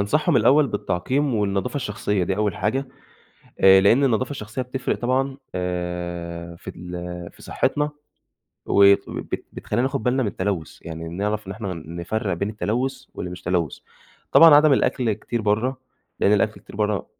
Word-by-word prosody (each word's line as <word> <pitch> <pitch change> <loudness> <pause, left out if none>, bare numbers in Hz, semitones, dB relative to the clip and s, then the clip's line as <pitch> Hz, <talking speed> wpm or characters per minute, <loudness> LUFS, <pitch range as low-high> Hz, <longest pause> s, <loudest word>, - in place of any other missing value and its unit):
أنصحهم 150 +8 +2
الأول 140 +6 +5
بالتعقيم، 130 +7 -1
والنضافة 100 +3 -1
الشخصية، 105 -6 -1
دي 95 +2 -1
أول 105 -3 0
حاجة. 130 +8 -1 0.7
آآ، 95 0 +7
لإن 115 +8 +5
النضافة 130 0 +1
الشخصية 110 -2 -5
بتفرق 125 +1 -2
طبعًا، 135 +2 0 0.2
آآ، 85 -1 -4
في - - -10
ال 90 0 -7
في - - -19
صحتنا، 150 0 0 0.8
و 100 - +4 0.3
وبت - - -5
بتخلينا 110 +3 -2
ناخد 135 +1 -1
بالنا 130 +1 +1
من 110 - 0
التلوث، 95 -5 -3
يعني 80 0 -6
نعرف 105 +4 -2
إن 95 - -5
إحنا 100 -3 -5
نفرق 85 +6 -4
بين 100 +4 -2
التلوث 125 +5 -2
واللي 90 - -5
مش 90 0 -9
تلوث. 85 -4 -1 0.5
طبعًا 165 -2 +9
عدم 150 0 +6
الأكل 125 -4 +2
كتير 115 +2 -4
برّا، 110 +6 +1 0.4
لإن 100 - +4
الأكل 105 +1 +1
كتير - - -13
برّا 105 -2 0
105 Hz, 155 wpm, -23 LUFS, 90-130 Hz, 0.8 s, طبعًا